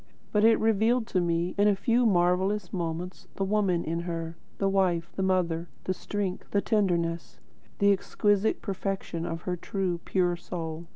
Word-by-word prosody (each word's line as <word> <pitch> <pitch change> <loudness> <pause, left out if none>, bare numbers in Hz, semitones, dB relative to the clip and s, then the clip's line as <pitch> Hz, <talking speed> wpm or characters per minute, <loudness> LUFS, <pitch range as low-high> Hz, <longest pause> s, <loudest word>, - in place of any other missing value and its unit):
But 210 0 +2
it 225 0 +6
revealed 225 +2 +2
to 185 - +1
me, 170 +1 0
in 205 - +5
a 205 - +4
few 235 +4 +2
marvellous 185 +1 +1
moments, 175 +1 -4
the 195 - -1
woman 195 -3 +1
in 165 +2 -2
her; 165 -1 -4 0.2
the 195 - +1
wife, 180 -3 +1
the - - -2
mother; 175 -3 0
the 185 - -1
strength, 190 0 -4
the 200 - +2
tenderness; 170 -6 0 0.4
the 200 0 +4
exquisite 205 +2 +1
perfection 195 -4 -3
of 165 0 -4
her 180 - -1
true, 180 0 -2
pure 180 -2 +1
soul. 170 -1 -6
185 Hz, 165 wpm, -28 LUFS, 170-200 Hz, 0.4 s, it